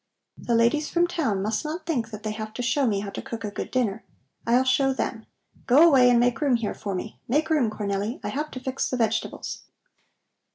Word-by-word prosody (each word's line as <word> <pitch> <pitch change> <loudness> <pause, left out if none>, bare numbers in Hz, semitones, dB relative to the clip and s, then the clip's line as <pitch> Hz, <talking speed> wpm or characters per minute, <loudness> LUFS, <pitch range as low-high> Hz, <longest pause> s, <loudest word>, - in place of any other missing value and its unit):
The 235 - 0
ladies 240 +7 +2
from 345 0 +3
town 270 - -1
must 215 +1 -1
not 315 +2 -5
think 250 -9 -1
that 215 -2 -9
they 215 - -2
have 215 0 -6
to 245 - -3
show 265 +2 +2
me 200 -3 0
how 200 -1 -5
to - - -5
cook 225 -1 -7
a 210 - -3
good - - -5
dinner. 225 -4 -1 0.4
I'll 245 +2 +4
show 265 +1 +2
them. 225 -3 -4 0.4
Go 295 +7 +7
away 260 -6 +6
and 240 -1 +5
make 245 +2 +1
room 280 -4 +3
here 230 -3 -2
for 200 -2 -5
me. 200 +4 -6
Make 300 +6 +1
room, 280 -8 +3
Cornelli! 205 +2 -3
I - - -2
have 300 +2 -3
to 255 - -7
fix 260 +1 -2
the 255 - -2
vegetables." 225 -1 -2
240 Hz, 220 wpm, -25 LUFS, 215-270 Hz, 0.4 s, Go